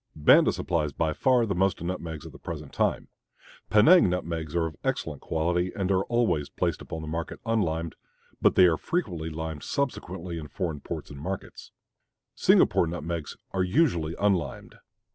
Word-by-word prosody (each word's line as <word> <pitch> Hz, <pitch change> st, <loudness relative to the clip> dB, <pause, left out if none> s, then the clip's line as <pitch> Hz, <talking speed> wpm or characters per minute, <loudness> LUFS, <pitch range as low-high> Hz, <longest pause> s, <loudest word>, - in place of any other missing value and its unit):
Banda 75 Hz, -1 st, +6 dB
supplies 75 Hz, -5 st, -1 dB
by 80 Hz, +1 st, 0 dB
far 125 Hz, -, +3 dB
the 100 Hz, -, -1 dB
most 95 Hz, 0 st, +1 dB
nutmegs 85 Hz, -3 st, -5 dB
at 80 Hz, -, -9 dB
the -, -, -14 dB
present -, -, -7 dB
time. -, -, 0 dB, 0.6 s
Penang 110 Hz, -, +6 dB
nutmegs 85 Hz, -3 st, -3 dB
are 85 Hz, -1 st, +2 dB
of 80 Hz, -2 st, -5 dB
excellent 75 Hz, -4 st, -2 dB
quality 90 Hz, +3 st, 0 dB
and 95 Hz, -1 st, -1 dB
are 95 Hz, 0 st, +2 dB
always 110 Hz, -12 st, +1 dB
placed -, -, -2 dB
upon 80 Hz, -1 st, -6 dB
the -, -, -7 dB
market 80 Hz, +2 st, -4 dB
unlimed, 85 Hz, -8 st, 0 dB, 0.5 s
but -, -, +4 dB
they 95 Hz, -, +7 dB
are 85 Hz, -3 st, +3 dB
frequently 90 Hz, -, -2 dB
limed 80 Hz, -1 st, -5 dB
subsequently 90 Hz, -, -3 dB
in 75 Hz, -, -7 dB
foreign 80 Hz, -4 st, -3 dB
ports -, -, -6 dB
and 70 Hz, -1 st, -9 dB
markets. 95 Hz, +4 st, -6 dB, 0.6 s
Singapore 85 Hz, -, +4 dB
nutmegs 85 Hz, -2 st, -4 dB
are 95 Hz, -, 0 dB
usually 90 Hz, -, +1 dB
unlimed. 100 Hz, -4 st, 0 dB
85 Hz, 160 wpm, -27 LUFS, 80-95 Hz, 0.6 s, they